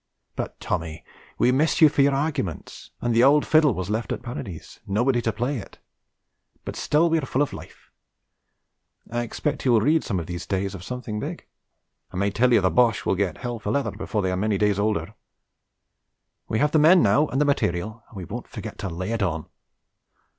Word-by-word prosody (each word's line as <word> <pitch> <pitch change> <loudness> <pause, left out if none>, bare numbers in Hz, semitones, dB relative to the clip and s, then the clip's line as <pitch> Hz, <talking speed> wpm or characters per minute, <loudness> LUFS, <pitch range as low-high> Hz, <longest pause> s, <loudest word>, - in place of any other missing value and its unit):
But - - -5
Tommy 80 0 -4 0.3
we 125 - +3
miss 150 +5 +2
you 155 - +9
for 145 - +1
your 140 0 +4
arguments, 135 - -3
and 120 -1 0
the 115 +2 +4
old 145 +3 +5
fiddle 155 -7 +4
was 95 +2 -4
left 110 +2 -2
at - - -4
Parides, 100 -8 -7
nobody 120 +5 +1
to 115 - 0
play 120 +6 -2
it; - - -12 0.9
but - - -5
still 155 +3 +2
we 165 -1 +2
are 145 - -4
full 135 +4 +1
of 145 - -4
life. - - -12 1.2
I 120 +1 -1
expect 140 +5 -3
you 130 - +3
will 110 - +5
read 155 +7 +3
some 95 -5 -2
of 85 - -5
these 85 +1 -6
days 95 0 -1
of 95 -3 -8
something 125 -2 -5
big. - - -6 0.7
I - - -7
may 100 +2 +1
tell 125 +5 +2
you 115 - +5
the 95 - +2
Boches 120 -3 +3
will - - +2
get 95 -3 -1
hell 120 -2 -4
for 105 - -4
leather 140 +6 0
before 105 -3 -3
they 95 - 0
are - - 0
many 105 +2 0
days 105 0 +1
older. 100 -6 -1 1.3
We 110 - -1
have 150 +4 +2
the 155 - +4
men 170 +4 +6
now 110 +9 +4
and 135 - -2
the 150 - +3
material 110 -4 -1
and 110 - -12
we 90 - -6
won't - - -7
forget - - -8
to 100 - -3
lay 90 +5 -4
it 115 -1 -1
on. 80 -5 -1
115 Hz, 210 wpm, -24 LUFS, 95-140 Hz, 1.3 s, you